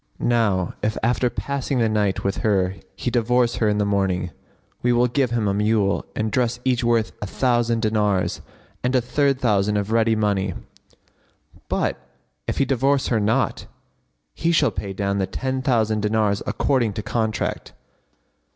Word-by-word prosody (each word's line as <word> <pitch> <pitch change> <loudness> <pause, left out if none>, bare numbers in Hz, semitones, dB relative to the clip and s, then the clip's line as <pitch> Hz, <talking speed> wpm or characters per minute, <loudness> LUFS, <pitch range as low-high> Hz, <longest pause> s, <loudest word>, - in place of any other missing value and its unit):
Now 105 -7 +1
if 110 +1 -1
after 125 +1 +2
passing 140 +2 -3
the 115 -2 +3
night 105 -3 0
with 100 0 -1
her 95 -3 +1 0.2
he 125 - -3
divorce 120 0 +2
her 110 - +2
in 105 - +1
the 105 - +1
morning, 95 -3 0 0.5
we 125 - +2
will 120 0 +3
give 125 +1 +1
him 115 -3 0
a 100 - +1
mule 105 -1 +1
and 110 0 -1
dress 120 +1 0
each 125 -1 +1
worth 115 -2 +2
a 105 - -3
thousand 120 0 +1
dinars, 105 -3 +1 0.4
and 125 +1 +1
a - - +5
third 135 +2 +1
thousand 105 -4 +2
of 100 +1 -2
ready 115 0 +3
money; 100 -3 0 1.1
but - - -1 0.5
if - - -2
he 140 - +3
divorce 135 +1 +1
her 115 - +2
not, 105 +1 0 0.7
he 165 - 0
shall 165 - +3
pay 100 - -5
down 100 +1 -1
the 95 - 0
ten 130 +6 -3
thousand 110 -5 +1
dinars 105 -1 +1
according 120 -6 +1
to 105 - -5
contract." 110 -1 -2
110 Hz, 165 wpm, -22 LUFS, 105-125 Hz, 1.1 s, a